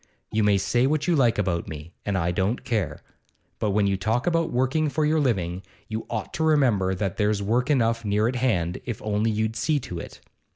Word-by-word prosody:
You 110 0 +1
may 105 -1 +4
say 120 +6 +2
what 150 +1 0
you 175 - +3
like 120 -6 +3
about 90 -4 -1
me, 80 +2 -8
and 100 -2 +1
I 85 -1 0
don't 95 +7 -1
care; 95 -11 -2 0.6
but 105 - 0
when 100 0 +2
you 100 -1 +1
talk 110 +6 0
about 165 -1 +1
working 130 +5 +1
for 155 +1 0
your 155 +1 +2
living, 95 - 0 0.3
you 110 0 -4
ought 110 -2 -4
to 160 - -1
remember 120 -12 +3
that 95 -1 -2
there's 105 -1 +1
work 120 +6 +1
enough 115 -5 +2
near 105 +1 +1
at 125 +1 -1
hand, 90 -9 0
if 120 -4 -4
only 105 +1 +1
you'd 110 +1 -1
see 145 +6 +1
to 90 -7 -6
it. - - -9
110 Hz, 215 wpm, -25 LUFS, 95-130 Hz, 0.6 s, may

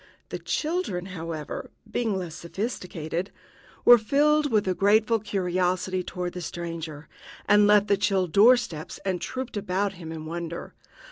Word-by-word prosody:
The - - -5
children, 310 - -2
however, 165 -4 -6 0.2
being 225 -4 0
less 175 -4 -5
sophisticated, 175 -1 -4 0.6
were 240 -1 +9
filled 290 +5 +2
with 210 -3 +2
a 185 - +2
grateful 215 +4 +3
curiosity 185 -2 -1
toward 180 0 -4
the 180 - -6
stranger, 165 -3 -6 0.4
and 205 0 +6
left 205 -1 +5
the 200 - +2
chill 195 -2 +2
door 210 +9 +6
steps 165 -11 -6
and 185 -2 -1
trooped 260 -4 -4
about 200 0 -1
him 170 -3 -9
in 160 -1 -6
wonder. 170 +1 -5
185 Hz, 145 wpm, -26 LUFS, 170-215 Hz, 0.6 s, were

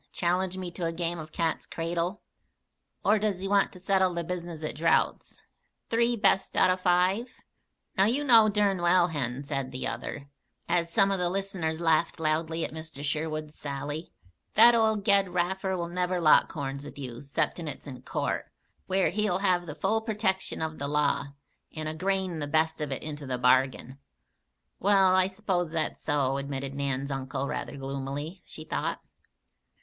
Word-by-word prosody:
Challenge 180 +1 0
me 180 -2 -5
to 170 -1 -3
a - - -1
game 170 0 -2
of 155 0 -8
cat's 165 -1 -1
cradle? 170 +4 -3 0.8
Or 215 +1 +4
does 200 -3 -1
he 195 - -2
want 200 0 +3
to 180 - -12
settle 190 -1 +2
the 170 - -1
business 170 -2 -5
at 155 - -2
draughts, 165 +2 0 0.5
three 235 +1 +3
best 200 -3 +2
out - - +5
o' - - +3
five?" 185 +6 +1 0.6
"Now 195 - +4
you 255 +7 +1
know 230 -6 +7
dern 200 -3 +1
well, 175 0 +4
Hen," 135 -4 -2
said 135 -2 -3
the 130 - -4
other, 140 -1 -5 0.4
as 170 -1 +1
some 195 -1 +4
of 195 - 0
the 175 -1 +1
listeners 185 -4 -2
laughed 165 0 +2
loudly 160 +1 0
at - - -7
Mr. 160 -3 -7
Sherwood's 155 +1 -2
sally, 145 +2 -5 0.4
"that 235 +3 +9
old 220 -3 +2
Ged 200 -2 +5
Raffer 190 +2 -1
will 170 -1 -2
never 180 +1 -1
lock 155 -3 +5
horns 140 -2 -4
with 145 -1 -10
you 125 -3 -7
'ceptin' 145 +4 -2
it's 150 - -6
in 130 -3 -8
court, - - -3 0.4
where 190 0 +2
he'll 210 -3 +1
have 180 -3 +1
the 150 - -6
full 220 +3 +1
pertection 205 -6 -1
of 160 0 -7
the 140 - -2
law, 140 -1 +1 0.5
and 155 -1 -3
a 155 - -2
grain 185 0 -1
the 145 - -3
best 160 +1 +1
of 150 -2 -3
it 135 - -3
into 150 -2 -6
the 130 -1 -1
bargain." 130 +1 +2 0.8
"Well, 195 -1 +4
I 185 0 +4
s'pose 190 -3 -1
that's 160 -1 -2
so," 140 -3 +1
admitted 140 -1 -4
Nan's 140 0 -2
uncle, 135 0 -3
rather 140 - -4
gloomily, 140 +5 -5
she 155 - -9
thought. - - -2
170 Hz, 175 wpm, -28 LUFS, 145-190 Hz, 0.8 s, that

